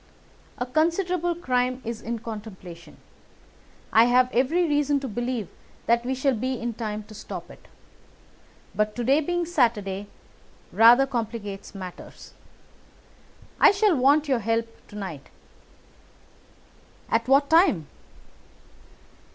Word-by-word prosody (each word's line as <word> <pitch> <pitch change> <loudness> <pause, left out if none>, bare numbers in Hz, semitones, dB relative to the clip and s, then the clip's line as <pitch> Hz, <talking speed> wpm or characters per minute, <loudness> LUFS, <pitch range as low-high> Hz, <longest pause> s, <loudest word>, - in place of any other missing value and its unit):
"A 245 - -2
considerable 340 +5 0
crime 255 -6 -1
is 230 0 -5
in 235 +1 -4
contemplation. 205 -6 -10 1.0
I 225 +1 +7
have 250 +1 +3
every 320 +8 +2
reason 290 -1 +1
to 270 - -4
believe 240 -2 -3 0.4
that 235 +1 +2
we 260 +2 -2
shall 265 +1 +1
be 255 +2 -3
in 235 0 -3
time 215 -2 -5
to 215 - -14
stop - - -8
it. - - -17 1.1
But 210 0 -1
to 245 - -3
day 275 +6 +3
being 350 +2 -1
Saturday 210 - 0 0.6
rather 240 +4 +6
complicates 220 -6 -5
matters. 185 -2 -10 1.3
I - - +8
shall 405 -2 +3
want 285 +3 +3
your 260 -4 +1
help 230 +1 -1 0.2
to 210 - -14
night." 185 -9 -7 1.8
"At 230 +1 +1
what 275 +2 +4
time?" 320 - +4
245 Hz, 120 wpm, -25 LUFS, 215-285 Hz, 1.8 s, I